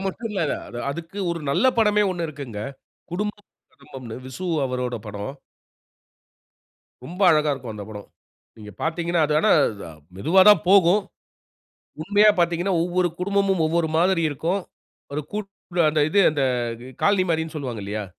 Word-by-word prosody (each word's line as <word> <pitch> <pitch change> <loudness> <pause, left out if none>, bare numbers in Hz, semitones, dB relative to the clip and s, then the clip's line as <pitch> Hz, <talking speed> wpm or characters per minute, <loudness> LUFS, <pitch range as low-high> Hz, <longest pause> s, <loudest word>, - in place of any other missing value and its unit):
மட்டும் 225 +4 -4
இல்ல. 200 -3 -2 0.5
அதுக்கு 170 +6 -7
ஒரு 170 -1 -3
நல்ல 200 - +2
படமே 210 -2 +4
ஒண்ணு 175 -2 -3
இருக்குங்க. 140 -8 -7 0.5
குடும்பம் 205 +2 -3
ஒரு - - -70
குடும்பம்ன்னு 130 -4 -10
விசு 130 +8 -6 0.2
அவரோட 125 -1 -3
படம். 105 +5 -6 1.7
ரொம்ப 175 +8 -9
அழகா 150 -2 +3
இருக்கும் 125 -5 -6
அந்த 105 -1 -7
படம். 105 -2 -9 0.5
நீங்க 105 -1 -10
பாத்தீங்கன்னா 170 +1 0
அது 150 - 0
ஆனா - - +3 0.7
மெதுவா 165 - +3
தான் 205 -6 +5
போகும். 195 +1 +5 1.0
உண்மையா 205 +4 +5
பாத்தீங்கன்னா 175 +2 +1
ஒவ்வொரு 180 +1 +1
குடும்பமும், 195 -1 +1
ஒவ்வொரு 165 0 0
மாதிரி 180 0 +2
இருக்கும். 165 +7 -1 0.5
ஒரு 150 +2 -2
கூட்டு 200 -4 -5
அந்த 155 0 +1
இது 200 - +4
அந்த 145 -2 -1 0.6
காலனி 200 -2 +3
மாரின்னு 160 0 -1
சொல்வாங்க 125 -7 -5
இல்லையா. 105 +1 -4
170 Hz, 140 wpm, -23 LUFS, 140-190 Hz, 1.7 s, தான்